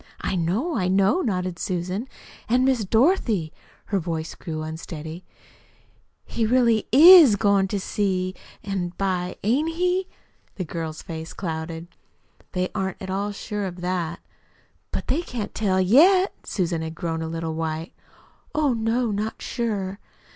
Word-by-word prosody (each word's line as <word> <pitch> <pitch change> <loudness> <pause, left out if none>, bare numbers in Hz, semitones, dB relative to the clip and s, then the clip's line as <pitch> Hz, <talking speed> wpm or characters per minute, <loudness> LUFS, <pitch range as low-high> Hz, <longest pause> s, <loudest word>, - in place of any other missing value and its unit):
"I - - -1
know, 195 - 0
I 180 - +1
know," 195 - +3
nodded 185 - -2
Susan. 185 +6 -3 0.4
"An' 250 +2 +3
Miss 260 -4 +2
Dorothy" 220 - +2 0.4
her 200 - +1
voice 165 -2 -4
grew 155 -3 -5
unsteady 160 +1 -7 1.0
"he 230 - -2
really 230 -1 +3
IS 310 - +9
goin' 200 -1 +3
to 200 +1 -2
see 185 -2 -1 0.3
by 200 - -6
an' 180 -3 -2
by, 180 -2 -1
ain't 295 +10 +1
he?" 360 +2 +1 0.5
The 185 - -4
girl's 160 -1 -5
face 160 -1 -7
clouded. 165 -1 -5 0.7
"They 185 0 0
aren't 190 -2 -3
at 190 -1 -6
all 200 +2 -1
sure 205 0 -4
of 180 -1 -6
that." 175 -2 -2 0.7
"But - - -4
they 280 +6 0
can't 240 -10 -5
tell 190 -3 +1
YET?" 345 - +5
Susan 170 -4 -1
had 160 0 -5
grown 165 -1 -3
a 160 - -3
little 165 0 -3
white. 160 +1 -3 0.6
"Oh, 300 -4 +2
no, 230 +1 0
not 210 +2 -3
sure." 205 -5 -3
190 Hz, 145 wpm, -24 LUFS, 170-230 Hz, 1.0 s, IS